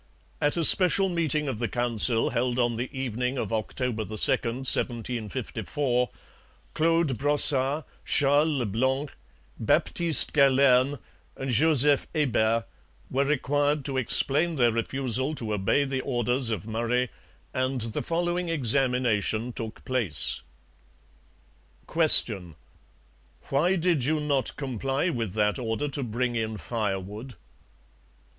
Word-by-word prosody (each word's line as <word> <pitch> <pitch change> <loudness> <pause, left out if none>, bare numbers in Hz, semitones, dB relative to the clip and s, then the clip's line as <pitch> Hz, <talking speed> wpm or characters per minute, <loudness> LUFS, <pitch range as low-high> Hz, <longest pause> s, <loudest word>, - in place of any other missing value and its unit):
At 145 +3 0
a 165 - +2
special 190 +3 +7
meeting 155 -4 -1
of 125 -5 -4
the 120 - -2
Council 115 0 0
held 120 +1 -2
on 120 -2 0
the 125 +3 -5
evening 125 0 -4
of 115 -3 -4
October 110 +1 -3
2, - - -12
1754, 125 - -1 0.6
Claude 165 -5 0
Brossart, 145 0 +4 0.2
Charles 145 +2 +2
Le 135 -6 -2
Blanc, 130 +7 -2 0.5
Baptiste 170 -3 +3
Galerne, 135 -1 +3 0.4
and 135 -1 -4
Joseph 145 +2 +3
Hebert 115 -6 0 0.5
were 135 +2 0
required 145 0 -1
to 135 -2 -1
explain 150 +6 +2
their 120 -4 +2
refusal 130 +4 -2
to 110 -6 -3
obey 105 +8 0
the 135 -1 -3
orders 125 -1 -1
of 110 -2 -4
Murray, 120 +2 -2 0.4
and 130 0 -2
the 110 -1 -5
following 175 +1 -3
examination 125 - -1
took 115 -1 -8
place: 110 - +2 1.5
Q. 110 - +5 0.9
Why 165 +7 +1
did 170 -6 0
you 155 +4 0
not 145 -3 -2
comply 135 - -3
with 115 - -4
that 105 +2 0
order 115 +4 -3
to 140 0 -4
bring 120 0 -3
in 110 -1 -3
firewood? 105 +2 -5
130 Hz, 120 wpm, -25 LUFS, 115-145 Hz, 1.5 s, special